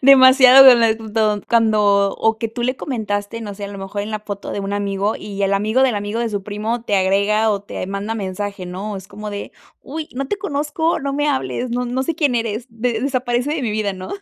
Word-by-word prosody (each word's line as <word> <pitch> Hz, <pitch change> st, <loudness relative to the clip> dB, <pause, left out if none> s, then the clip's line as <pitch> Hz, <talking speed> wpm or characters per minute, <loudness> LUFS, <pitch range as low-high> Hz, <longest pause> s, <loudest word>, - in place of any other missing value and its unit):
demasiado 260 Hz, 0 st, +8 dB
de 260 Hz, -2 st, +10 dB
lent 225 Hz, -1 st, +2 dB, 0.5 s
cuando 210 Hz, -3 st, +3 dB
o 225 Hz, 0 st, 0 dB
que 225 Hz, 0 st, -2 dB
tú 240 Hz, +2 st, -5 dB
le 255 Hz, +2 st, 0 dB
comentaste, 215 Hz, -3 st, -3 dB
no 205 Hz, -2 st, -6 dB
sé, 200 Hz, 0 st, -7 dB
a -, -, -5 dB
lo 200 Hz, -1 st, -8 dB
mejor, 195 Hz, +1 st, -5 dB
en 215 Hz, -, -6 dB
la 215 Hz, -1 st, -3 dB
foto 205 Hz, -1 st, -6 dB
de 200 Hz, -, -3 dB
un 195 Hz, +1 st, -4 dB
amigo, 200 Hz, +1 st, -1 dB
y 200 Hz, -1 st, -6 dB
el 195 Hz, 0 st, +1 dB
amigo, 215 Hz, +6 st, +2 dB
del 255 Hz, -4 st, +3 dB
amigo, 205 Hz, +3 st, -3 dB
de 235 Hz, -, 0 dB
su 200 Hz, -2 st, -3 dB
primo, 215 Hz, +3 st, -3 dB
te 205 Hz, -4 st, 0 dB
agrega 200 Hz, +3 st, +2 dB
o 200 Hz, -2 st, -1 dB
te 200 Hz, -, -6 dB
manda 200 Hz, +3 st, -4 dB
mensaje, 200 Hz, -1 st, -4 dB
¿no? 195 Hz, +3 st, -5 dB
Es 190 Hz, +1 st, -10 dB
como 210 Hz, +1 st, -8 dB
de: 200 Hz, 0 st, -6 dB, 0.3 s
"Uy, 310 Hz, +2 st, -6 dB
no 275 Hz, +1 st, -3 dB
te 410 Hz, -, -1 dB
conozco, 320 Hz, -2 st, -1 dB
no 275 Hz, 0 st, -3 dB
me 290 Hz, +1 st, 0 dB
hables, 130 Hz, -, -2 dB
no 250 Hz, +1 st, -1 dB
no 250 Hz, +2 st, -2 dB
sé 325 Hz, +4 st, -2 dB
quién 290 Hz, -5 st, +1 dB
eres, 230 Hz, +1 st, -2 dB
de 230 Hz, 0 st, -2 dB
desaparece 255 Hz, +1 st, -1 dB
de 295 Hz, -, -3 dB
mi 225 Hz, -, -1 dB
vida", 210 Hz, -2 st, -1 dB
¿no? 185 Hz, 0 st, -8 dB
220 Hz, 235 wpm, -19 LUFS, 200-250 Hz, 0.5 s, de